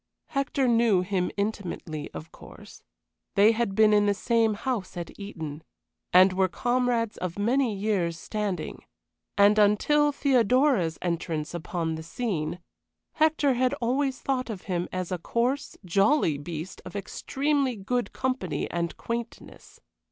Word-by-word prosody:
Hector 275 -1 0
knew 230 -5 +4
him 185 -1 -1
intimately, 185 -7 -3
of 160 - -9
course; - - -14 0.5
they 205 +3 +6
had 225 -3 -1
been 215 0 +5
in 205 0 +4
the 205 - +2
same 225 0 +2
house 210 -5 -3
at 170 -1 -5
Eton, 160 -7 -6 0.5
and 185 +1 +7
were 190 0 +2
comrades 240 +1 0
of 180 0 -4
many 235 +2 +1
years' 195 -5 0
standing, 200 -3 -4 0.5
and 205 +1 +6
until 290 +9 +4
Theodora's 255 - +2
entrance 165 -3 -2
upon 170 -1 -3
the 160 - -5
scene, 170 -2 -3 0.6
Hector 310 -3 +3
had 255 +1 +1
always 260 +2 0
thought 255 -2 -2
of 205 -5 -6
him 175 -2 -2
as 185 -1 -4
a 180 - -2
coarse, 250 - -1
jolly 195 - +2
beast 165 +4 -7
of - - -10
extremely 275 +5 -1
good 240 +5 -2
company 255 - -2
and 170 -1 -2
quaintness. 235 0 -7
205 Hz, 135 wpm, -27 LUFS, 180-250 Hz, 0.6 s, and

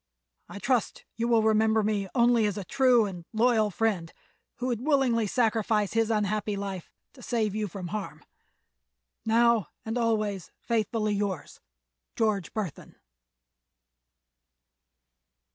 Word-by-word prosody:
I - - -8
trust 240 +2 -1
you 230 +1 -1
will 230 -2 +3
remember 220 0 +3
me 205 -2 0
only 235 -3 +4
as 205 - -3
a 200 - -4
true 255 0 +3
and 180 -4 -6
loyal 220 -1 +3
friend 195 -5 -1 0.4
who 240 +1 -5
would 240 -3 -1
willingly 260 -7 +2
sacrifice 220 -2 +1
his 225 0 +2
unhappy 210 -1 0
life 195 -3 -5 0.2
to 260 - -15
save 225 -5 -1
you 215 0 -2
from 180 -1 -7
harm. 210 0 -6 1.0
Now 235 -1 +3 0.2
and 225 +2 -2
always 215 -5 -1
faithfully 220 -2 -1
yours_, 200 -6 -3 0.6
"GEORGE 210 -6 0
BURTHON." 205 -8 -5
220 Hz, 125 wpm, -27 LUFS, 205-230 Hz, 1.0 s, only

